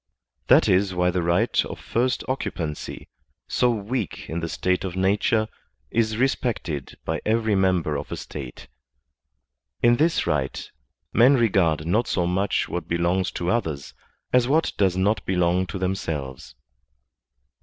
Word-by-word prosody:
That - - +6
is 95 0 +2
why 90 0 +2
the 90 0 0
right 85 +1 +2
of - - -7
first 125 +2 0
occupancy, 85 - -4 0.4
so 125 - +2
weak 115 -1 -3
in 80 - -3
the 85 0 -4
state 90 +2 0
of 90 -2 -4
nature, 100 +3 +2 0.4
is 110 -2 +1
respected 115 - -1
by - - -2
every 110 0 +1
member 90 -5 +2
of - - -7
a - - -3
State. 65 -4 -8 1.2
In 120 0 +5
this 165 +4 +2
right 70 -3 -1 0.5
men 125 +5 +6
regard 95 - +2
not 110 +8 +1
so 90 - 0
much 95 +3 0
what 85 -2 -4
belongs 85 +2 +1
to 85 +1 -1
others 80 -12 -2 0.4
as 125 -1 +4
what 155 +4 +2
does 95 -3 +2
not 100 +2 +1
belong 90 0 +1
to 90 - -5
themselves. 80 -8 -4
95 Hz, 145 wpm, -24 LUFS, 85-110 Hz, 1.2 s, That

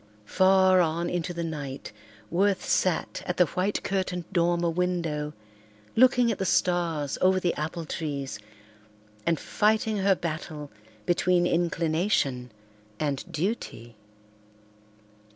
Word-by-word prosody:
Far 190 - +4
on 170 +1 0
into 175 -1 -2
the 170 -1 -4
night 145 -5 -5 0.4
Worth 195 +2 +1
sat 185 -3 0
at 180 - -2
the 180 - +6
white 185 +5 -1
curtained 185 -2 -2
dormer 170 -1 +2
window, 165 -4 -1 0.6
looking 245 -1 +5
at 210 - -4
the - - 0
stars 170 -6 0
over 185 0 +4
the 175 -2 0
apple 160 +2 -4
trees, 140 -7 -4 0.9
and 165 -2 +2
fighting 215 0 +1
her 195 0 +3
battle 155 -3 -5 0.3
between 175 0 +2
inclination 165 -6 0 0.5
and 145 -3 -1
duty. 150 - -4
175 Hz, 115 wpm, -27 LUFS, 155-185 Hz, 0.9 s, the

